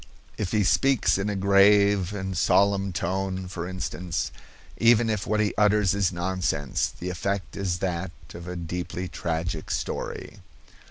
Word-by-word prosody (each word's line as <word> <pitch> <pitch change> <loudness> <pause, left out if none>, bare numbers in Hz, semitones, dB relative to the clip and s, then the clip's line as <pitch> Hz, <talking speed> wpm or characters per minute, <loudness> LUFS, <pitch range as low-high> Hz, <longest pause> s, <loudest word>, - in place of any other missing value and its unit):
If 95 -3 -3
he 105 -1 +2
speaks 135 0 +3
in 100 +2 -1
a 105 - -2
grave 100 0 +4
and 95 -2 -4
solemn 100 +2 +3
tone, 95 +2 -2
for 90 -1 -5
instance, 90 -2 -3 0.5
even 115 -1 +4
if 105 -3 -2
what 105 0 +1
he 105 -1 +1
utters 105 -2 +4
is 100 -3 +1
nonsense, 90 -5 -1
the 90 +1 -3
effect 100 +2 -3
is 95 -3 -1
that 90 0 -2 0.2
of 85 +1 -9
a 90 - -5
deeply 90 +1 -4
tragic 80 -2 -3
story. - - -4
95 Hz, 150 wpm, -26 LUFS, 90-100 Hz, 0.5 s, grave